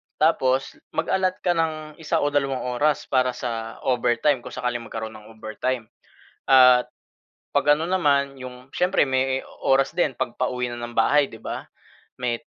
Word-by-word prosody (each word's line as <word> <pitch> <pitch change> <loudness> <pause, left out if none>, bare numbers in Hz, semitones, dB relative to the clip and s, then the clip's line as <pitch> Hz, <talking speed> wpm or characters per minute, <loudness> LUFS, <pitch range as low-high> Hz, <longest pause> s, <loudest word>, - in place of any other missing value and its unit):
Tapos, 135 -4 +1 0.2
mag-allot 190 -1 +1
ka 180 - +3
ng 155 -2 -2
isa 155 -2 0
o 145 - +1
dalawang 135 -2 0 0.2
oras 150 -1 +2
para 130 -1 +1
sa 115 -2 -5
overtime 125 +2 +2
kung - - -10
sakaling 125 -1 -2
magkaroon 110 0 -5
ng 105 -1 -13
overtime. 110 +2 -4 0.6
At, 125 -2 +7 0.7
'pag 145 - +5
ano 160 +2 -3
naman 140 -7 +2
yung 125 0 -10
siyempre 180 -1 +3
may 130 0 +1 0.2
oras 135 0 +3
din 165 -6 +2
'pag 120 - -2
pauwi 125 -1 -1
na - - -5
ng 120 0 -6
bahay, 145 +6 +4
'di 110 - -12
ba? - - -5 0.6
May, 120 -2 -1
130 Hz, 160 wpm, -24 LUFS, 125-150 Hz, 0.7 s, At